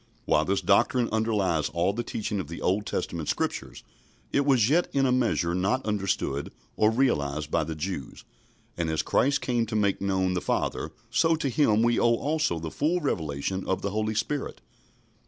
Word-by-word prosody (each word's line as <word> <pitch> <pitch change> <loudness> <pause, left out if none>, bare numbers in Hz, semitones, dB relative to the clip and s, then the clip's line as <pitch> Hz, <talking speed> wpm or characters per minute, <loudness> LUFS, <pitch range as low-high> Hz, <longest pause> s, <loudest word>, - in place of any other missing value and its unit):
While - - +3
this - - 0
doctrine 125 -2 +3
underlies 105 -8 +1
all 85 +3 0
the 120 - -2
teaching 105 -3 -3
of 90 - -4
the 85 - -7
Old 100 +3 0
Testament 85 -3 -3
Scriptures, - - -3 0.5
it 140 0 +2
was 125 -6 +4
yet 170 +6 +3
in 135 -1 +3
a 130 - +2
measure 115 -9 +1
not 95 +9 0
understood 95 -9 -1 0.2
or 110 - +4
realised 75 - 0
by - - +2
the 80 - -5
Jews, 75 -4 -5 0.5
and 85 -2 -1
as 80 0 0
Christ 140 +2 +2
came 120 -2 0
to 110 - -4
make 100 -3 +1
known 95 -1 +1
the 90 - -1
Father, - - -1 0.2
so 165 0 +3
to 155 -3 -2
Him 115 -5 +3
we 120 0 +3
owe 120 0 +4
also 150 - 0
the 80 -1 -5
full 165 +5 0
revelation 90 - -2
of 95 - -1
the 100 - -1
Holy 110 +1 -1
Spirit. 140 +6 -2
105 Hz, 185 wpm, -27 LUFS, 85-125 Hz, 0.5 s, was